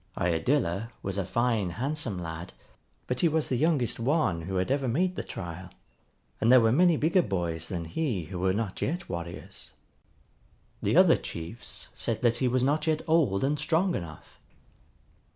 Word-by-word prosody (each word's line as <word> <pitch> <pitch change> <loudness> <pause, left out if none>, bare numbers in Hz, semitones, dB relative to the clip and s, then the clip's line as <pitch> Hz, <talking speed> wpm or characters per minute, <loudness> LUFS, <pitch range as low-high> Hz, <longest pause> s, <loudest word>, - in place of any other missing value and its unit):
Iadilla 95 - 0
was 100 0 -2
a 95 - -1
fine 115 -3 +1
handsome 135 -5 -2
lad, 85 0 -6 0.5
but 125 0 -2
he 170 - +5
was 160 -1 0
the 130 - +1
youngest 140 -4 +1
one 120 - +1
who 95 +4 -5
had 95 +5 0
ever 135 -1 +1
made 180 +10 +1
the - - -3
trial, 85 +1 -7 0.7
and 115 - +3
there 130 - +9
were 115 -1 +4
many 170 +4 +4
bigger 165 +5 +3
boys 85 - -2
than 85 -3 -4
he 110 - -2
who 90 +4 -6
were 95 +1 +2
not 105 0 -3
yet 175 +4 -2
warriors. 85 0 -6 1.1
The - - +2
other - - +7
chiefs 85 +8 -7
said - - -1
that 120 -1 +3
he 130 - +1
was 125 0 +1
not 150 +4 +1
yet 155 -1 +1
old 145 -12 +3
and 145 +2 +1
strong 170 +5 +1
enough. 85 - -7
120 Hz, 170 wpm, -28 LUFS, 90-150 Hz, 1.1 s, there